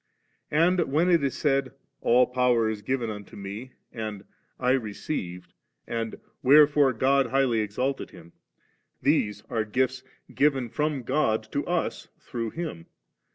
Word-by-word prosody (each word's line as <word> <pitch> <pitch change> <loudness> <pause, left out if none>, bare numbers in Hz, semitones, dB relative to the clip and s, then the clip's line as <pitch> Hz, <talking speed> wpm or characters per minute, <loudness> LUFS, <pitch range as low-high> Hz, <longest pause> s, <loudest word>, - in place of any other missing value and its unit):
And 170 +4 +3
when 165 +5 +3
it 170 -4 +4
is 140 - -1
said, 135 -3 +1
' - - -49
AU 125 +2 +5
power 125 -2 +2
is 110 -1 -3
given 120 0 -1
unto 105 -2 -9
Me,' 100 +6 -7 0.2
and 110 -3 -5 0.4
'I 125 0 +2
received,' 100 - -3 0.3
and 115 -1 -3 0.3
'Wherefore 145 0 +6
God 135 +3 +2
highly 130 -2 +2
exalted 125 +6 -2
Him,' 85 +1 -15 0.7
these 105 0 +1
are 110 -2 -1
gifts 130 +4 0 0.3
given 135 -4 +2
from 150 0 -1
God 115 -4 +1
to 145 - -1
us 175 -1 -2
through 115 -4 -4
Him. 155 - -6
125 Hz, 140 wpm, -26 LUFS, 110-140 Hz, 0.7 s, Wherefore